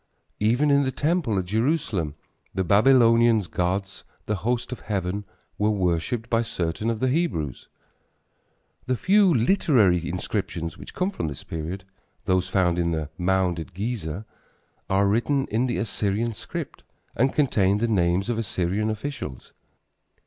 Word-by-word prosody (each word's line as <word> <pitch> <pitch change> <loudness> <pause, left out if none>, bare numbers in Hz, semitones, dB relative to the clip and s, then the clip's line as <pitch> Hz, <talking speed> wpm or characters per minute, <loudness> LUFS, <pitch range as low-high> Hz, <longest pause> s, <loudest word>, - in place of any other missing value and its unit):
Even 125 +8 +3
in 140 0 +5
the 130 -1 0
temple 150 - 0
at 95 - 0
Jerusalem 110 - 0 0.4
the 95 - +1
Babylonians' 115 +1 +5
gods, 95 +3 -2 0.2
the 105 - -1
host 120 +7 -2
of 125 - -5
heaven, 100 0 -3 0.3
were 105 +1 +3
worshipped 100 +3 0
by 115 0 +2
certain 100 -1 -2
of 115 -2 -1
the 130 - +2
Hebrews. 125 - -1 1.2
The 130 - +1
few 195 - +4
literary 115 - +3
inscriptions 90 -2 -3
which - - -11
come 185 +2 0
from 85 - -3
this 70 -3 -6
period, 85 +4 -5 0.4
those 95 0 +1
found 90 -3 +2
in 85 -1 +1
the 75 -2 -3
mound 90 -1 +1
at 85 +2 -8
Gezer, 100 -3 -3 0.6
are 95 +1 +3
written 135 +7 +1
in 115 +4 +1
the 120 - -1
Assyrian 110 +2 -1
script 105 - -7 0.3
and 130 +4 +2
contain 100 -9 +2
the 115 +3 0
names 95 -2 +1
of 120 -2 -1
Assyrian 100 0 -1
officials. 110 - -5
105 Hz, 145 wpm, -25 LUFS, 90-120 Hz, 1.2 s, in